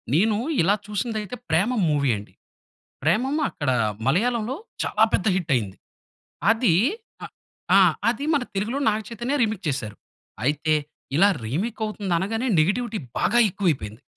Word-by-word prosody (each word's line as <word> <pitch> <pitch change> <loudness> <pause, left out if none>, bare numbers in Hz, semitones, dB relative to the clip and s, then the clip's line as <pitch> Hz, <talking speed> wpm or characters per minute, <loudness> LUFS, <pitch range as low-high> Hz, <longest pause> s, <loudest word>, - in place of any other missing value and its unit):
నేను 210 +4 +3 0.2
ఇలా 195 +5 +3
చూసింది 220 +2 -2
అయితే, 210 +3 -6
'ప్రేమం' 200 +7 +2
మూవీ 140 -3 +1
అండి. 100 - -11 0.7
'ప్రేమం,' 245 - +1
అక్కడ 145 -3 -2 0.4
మలయాళంలో 235 - +1 0.3
చాలా 215 - +3
పెద్ద 185 - +1
హిట్ 170 -5 -1
అయింది. 100 -5 -4 0.7
అది 225 -7 +2 0.5
అ - - -4 0.5
ఆ! - - +8 0.3
అది 260 +5 -1
మన 280 - +2
తెలుగులో 215 +8 -1
'నాగచైతన్య' 230 +5 -2
రీమేక్ 215 -4 -1
చేసారు. 110 -7 -3 0.5
అయితే, 150 +3 +1 0.4
ఇలా 195 +5 +6 0.2
రీమేక్ 190 - -3
అవుతుంది 205 -4 -2
అనగానే, 225 +7 -2
నెగెటివిటీ 215 +8 +1 0.2
బాగా 240 - +2
ఎక్కువ 195 +2 -3
అయిపోయింది. 110 -4 -5
205 Hz, 135 wpm, -24 LUFS, 155-230 Hz, 0.7 s, ఆ